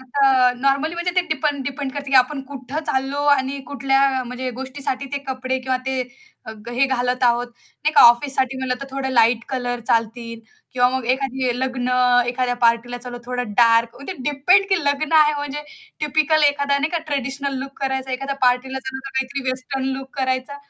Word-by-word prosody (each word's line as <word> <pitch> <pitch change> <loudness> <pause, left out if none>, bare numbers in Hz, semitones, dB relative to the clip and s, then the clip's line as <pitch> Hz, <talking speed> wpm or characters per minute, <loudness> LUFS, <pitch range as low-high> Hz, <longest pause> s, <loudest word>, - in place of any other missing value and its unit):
आता 260 -1 +3
नॉर्मली 275 +5 +1
म्हणजे 345 +1 -1
ते 365 - +6
डिपेंड 290 -2 -1
डिपेंड 280 0 -4
करतं, 285 0 -6
की 270 - -2
आपण 265 +3 +3
कुठं 270 +1 -6
चाललो 270 +2 -1
आणि 270 0 0
कुठल्या 270 -1 +1
म्हणजे 250 +1 -4
गोष्टीसाठी 265 +1 -5
ते 285 - 0
कपडे 260 0 -2
किंवा 255 0 0
ते 265 -1 0 0.6
ग 240 - -5
हे 265 +3 +3
घालत 250 -1 -1
आहोत. 240 0 +2
नाही 295 +5 -5
का - - +7
ऑफिससाठी 260 +2 +4
म्हणलं 260 -1 -1
तर 275 - -6
थोडं 270 0 -3
लाईट 235 -1 +3
कलर 245 -2 -3
चालतील 230 0 -1 0.3
किंवा 245 -1 +3
मग 260 - -4
एखाद्या 260 -1 0
लग्न, 255 -1 -2 0.4
एखाद्या 245 0 0
पार्टीला 235 +1 +2
चालो, 245 0 -8
थोडं 250 -3 -4
डार्क 230 0 +4
म्हणजे 280 +7 -6
ते 295 -3 -3
डिपेंड, 360 +8 +4
की 380 -4 +1
लग्न 285 +2 0
आहे 300 0 +4
म्हणजे 290 0 -4 0.4
टिपिकल 310 +1 +2
एखादा 285 0 0
नाही 305 +3 -1
का 340 - +1
ट्रेडिशनल 275 0 -2
लूक 270 +1 -8
करायचा, 265 -1 -2
एखाद्या 275 +2 -3
पार्टीला 250 +2 +1
चालो 265 0 -6
तर - - -6
काहीतरी 265 0 -3
वेस्टर्न 260 +1 -4
लूक 265 0 -11
करायचा, 260 +1 -1
265 Hz, 185 wpm, -21 LUFS, 250-280 Hz, 0.6 s, का